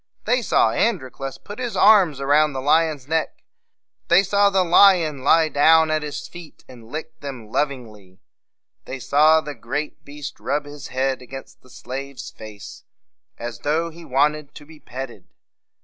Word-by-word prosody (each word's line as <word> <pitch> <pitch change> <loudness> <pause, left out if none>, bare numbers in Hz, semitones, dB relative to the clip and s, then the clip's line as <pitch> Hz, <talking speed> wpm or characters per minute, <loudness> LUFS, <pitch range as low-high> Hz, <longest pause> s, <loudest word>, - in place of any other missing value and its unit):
They 250 +1 +2
saw 115 - +2
Androclus 135 - -2
put 205 +3 -11
his 245 -2 -4
arms 185 -10 +5
around 145 +2 +2
the 135 - -4
lion's 150 0 +1
neck; 160 0 -2 0.6
they 185 +3 +5
saw 200 +1 +3
the 190 -1 +2
lion 170 -6 +4
lie 160 +3 +4
down 160 +2 +4
at 155 0 0
his 150 0 -6
feet, 175 -3 -13
and 115 -2 -15
lick 160 +1 -7
them 130 -7 -8
lov 145 +2 +1
ing 125 -4 -9
ly; 95 -3 -19 0.7
they 135 - -6
saw 155 +5 +4
the 150 -1 -7
great 145 +6 -5
beast 145 -1 -9
rub 145 +2 -2
his 145 -1 -9
head 130 0 -2
against 135 +2 -11
the 130 - -21
slave's 135 +2 -8
face 110 -2 -11 0.5
as 120 -3 -7
though 160 +3 -1
he 170 +1 -13
wanted 150 +1 0
to 145 - -12
be 155 0 -16
petted. 130 -1 -9
145 Hz, 165 wpm, -22 LUFS, 130-160 Hz, 0.7 s, arms